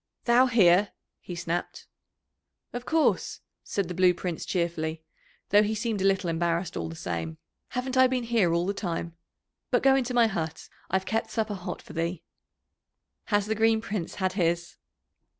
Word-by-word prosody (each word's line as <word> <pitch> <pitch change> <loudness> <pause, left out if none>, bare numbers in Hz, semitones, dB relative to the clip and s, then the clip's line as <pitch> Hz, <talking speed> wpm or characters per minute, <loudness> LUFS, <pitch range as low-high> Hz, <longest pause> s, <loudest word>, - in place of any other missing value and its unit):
"Thou 245 +2 +5
here!" 200 -4 +4 0.3
he 180 - -8
snapped. 170 0 -3 0.9
"Of 245 0 -6
course," 320 -1 +1 0.2
said 200 -3 -2
the 180 - -4
Blue 180 0 +4
Prince 175 -2 -4
cheerfully, 165 -3 -2 0.5
though 205 +1 +6
he 215 +1 0
seemed 215 -2 -2
a - - +1
little 195 -1 +2
embarrassed 170 +1 -1
all 80 - -3
the 80 - -7
same. 80 -1 -4 0.3
"Haven't 255 +1 -3
I 260 0 +7
been 255 -1 -1
here 230 -7 +2
all 170 +1 +1
the 200 - 0
time? 170 -4 -4 0.5
But - - +2
go 270 0 +6
into 255 -2 0
my 240 -1 +6
hut, 165 -7 -3 0.2
I've 190 +1 0
kept 225 0 -1
supper 220 -1 -1
hot 180 -2 -6
for - - -12
thee." 170 +1 -2 1.0
"Has 205 -2 +1
the 215 - 0
Green 220 0 +3
Prince 205 -6 -4
had 185 -1 -1
his?" 170 -2 -1
190 Hz, 170 wpm, -27 LUFS, 170-225 Hz, 1.0 s, I